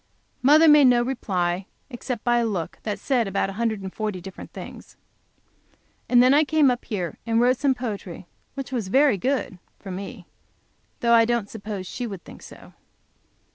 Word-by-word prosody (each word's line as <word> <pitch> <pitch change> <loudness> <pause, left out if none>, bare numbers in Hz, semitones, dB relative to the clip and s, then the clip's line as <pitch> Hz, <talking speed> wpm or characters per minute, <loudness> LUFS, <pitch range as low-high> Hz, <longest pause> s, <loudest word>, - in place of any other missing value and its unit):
Mother 305 +5 +6
made 295 -2 +7
no 240 -1 +4
reply, 190 -7 -2 0.2
except 240 -1 -5
by 240 0 +2
a 235 - +1
look 180 -7 -4
which 210 -2 -3
said 245 -6 0
about 195 0 -1
a 195 - -10
hundred 220 -4 -1
and 190 - -6
forty 210 -4 -3
different 190 +1 -10
things. - - -11 1.1
And 245 0 +6
then 255 +2 +5
I 300 +2 +5
came 300 -3 +3
up 245 - -4
here 185 -7 -4
and 230 0 +2
wrote 250 +2 +3
some 275 -1 +1
poetry, 205 -8 -6 0.3
which 275 -2 -6
was 235 -7 -2
very 265 0 +3
good 255 -6 -2 0.2
(for 195 - -9
me), 195 +1 -7 0.8
though 235 0 +3
I 230 -1 +6
don't 235 -3 -1
suppose 205 -3 -6
she 245 +6 -5
would 195 -5 -8
think - - -13
so. - - -14
230 Hz, 180 wpm, -24 LUFS, 195-255 Hz, 1.1 s, made